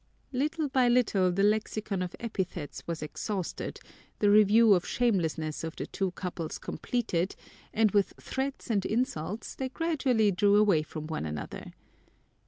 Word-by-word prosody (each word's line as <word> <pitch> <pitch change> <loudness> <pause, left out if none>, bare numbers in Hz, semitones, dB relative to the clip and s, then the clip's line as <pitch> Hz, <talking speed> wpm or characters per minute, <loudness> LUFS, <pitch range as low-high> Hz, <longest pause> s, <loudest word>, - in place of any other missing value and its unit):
Little 305 +4 0
by 260 -2 +3
little 215 -7 +3
the 195 +3 +1
lexicon 210 -1 0
of 180 -1 -4
epithets 185 -9 -4
was 165 -2 -3
exhausted, 185 +4 -4 0.4
the 205 -1 +3
review 215 +1 +7
of 180 -2 +2
shamelessness 165 -10 0
of 160 0 -4
the - - -4
two 195 -1 -2
couples 175 -3 -4
completed, 195 -7 -2 0.4
and 220 -2 +3
with 200 -1 +2
threats 265 -2 -3
and 200 -3 +2
insults 215 - -2
they 260 -1 -3
gradually 260 -9 +1
drew 200 +2 +3
away 205 -6 +5
from 155 0 -7
one 155 - -3
another. 75 -1 -6
205 Hz, 145 wpm, -29 LUFS, 175-240 Hz, 0.4 s, review